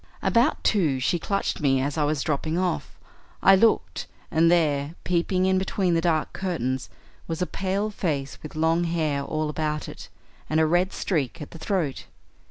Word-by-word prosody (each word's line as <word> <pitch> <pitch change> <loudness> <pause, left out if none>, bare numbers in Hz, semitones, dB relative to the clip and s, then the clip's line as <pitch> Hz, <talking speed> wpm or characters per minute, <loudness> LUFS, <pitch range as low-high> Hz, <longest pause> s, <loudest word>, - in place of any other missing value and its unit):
About 240 +7 +2
two 160 - +2
she 170 +7 +1
clutched 200 +4 -1
me 135 -3 +2
as 140 +2 -1
I 150 -2 +1
was 150 -1 0
dropping 155 +2 -1
off. 180 -1 -2 0.5
I 195 - +8
looked, 190 - +2 0.2
and 165 +1 +4
there, 155 -3 +2
peeping 180 +1 +1
in 190 0 +3
between 190 -1 0
the 165 - +2
dark 165 -3 0
curtains, 130 -9 -2 0.4
was 165 -1 -3
a 180 - +1
pale 195 +3 -2
face 145 -9 -3
with 155 - -9
long 165 +2 +2
hair 155 -4 0
all 155 +2 -2
about 150 0 -2
it, - - -10 0.4
and 155 - +2
a 160 - +4
red 175 +4 +2
streak 150 -10 -2
at 150 - -8
the 165 - -10
throat. 170 -8 -2
165 Hz, 175 wpm, -25 LUFS, 150-185 Hz, 0.5 s, I